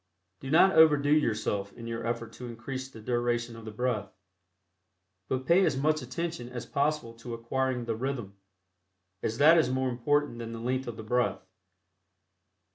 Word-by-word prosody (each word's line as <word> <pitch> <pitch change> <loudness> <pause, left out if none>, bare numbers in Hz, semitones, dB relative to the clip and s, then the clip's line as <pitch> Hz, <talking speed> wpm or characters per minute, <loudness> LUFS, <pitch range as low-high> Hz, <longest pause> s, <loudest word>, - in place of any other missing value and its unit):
Do 135 - -7
not 170 +6 +6
overdo 150 -3 +6
yourself 110 -8 +1
in 115 - -10
your 115 0 -4
effort 115 -1 -3
to 125 +2 -8
increase 130 +3 -6
the 115 - -12
duration 120 0 -1
of 115 -1 -10
the 110 - -6
breath, 105 -3 -2 1.2
but 130 0 -2
pay 175 +7 +5
as 135 - +2
much 155 +2 +1
attention 145 +1 -4
as 125 -2 -6
possible 140 -4 -1
to 115 0 -6
acquiring 125 +1 -1
the 115 -1 -1
"rhythm," 120 -5 -4 0.9
as 110 - -2
that 160 +4 +7
is 140 - +2
more 130 0 0
important 135 +1 0
than 115 -1 -6
the 115 - -6
length 130 +2 -2
of 120 - -5
the 110 - -7
breath. 120 +3 0
125 Hz, 170 wpm, -29 LUFS, 115-140 Hz, 1.2 s, that